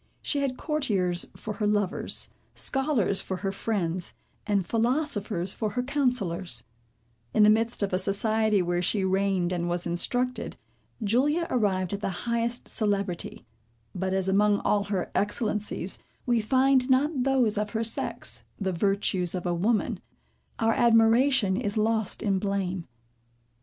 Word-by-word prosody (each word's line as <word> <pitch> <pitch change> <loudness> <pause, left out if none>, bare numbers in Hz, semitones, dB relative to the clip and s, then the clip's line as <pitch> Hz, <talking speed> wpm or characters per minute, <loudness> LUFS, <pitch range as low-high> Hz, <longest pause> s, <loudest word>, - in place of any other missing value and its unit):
She 290 - 0
had 270 -2 -1
courtiers 200 - -1
for 215 - -5
her 210 - 0
lovers, 205 -2 +1 0.2
scholars 265 -8 +1
for 190 - -4
her 195 - +1
friends, 185 -4 -2 0.3
and 200 -3 +1
philosophers 225 - 0
for 215 - -2
her 245 - -1
counsellors. 245 - 0 0.7
In 215 - +6
the 210 - +7
midst 225 0 +1
of 195 - -1
a 185 - +2
society, 210 +1 +1
where 175 0 0
she 195 +2 +1
reigned 190 -2 +1
and 175 -1 -1
was 175 0 -1
instructed. 245 +9 -1 0.5
Julia 285 +11 +2
arrived 195 -6 +1
at 200 - -2
the - - -1 0.2
highest 235 0 0
celebrity; 200 - -2 0.5
but 190 +1 -2
as 190 0 0
among 205 +2 +3
all 205 -1 +1
her 195 -3 -2
excellencies, 210 -3 -1 0.3
we 240 -2 +2
find 260 +3 +3
not 270 +2 +2
those 255 -5 +2
of 210 0 -1
her 225 0 0
sex, 225 - -2 0.2
the 190 -2 -1
virtues 190 -1 0
of 180 - -4
a 175 - +1
woman, 210 +6 0 0.6
our 225 0 +2
admiration 230 -1 +4
is 210 -1 -1
lost 220 0 0
in 195 -3 +1
blame. 190 -3 -2
210 Hz, 145 wpm, -27 LUFS, 190-235 Hz, 0.7 s, the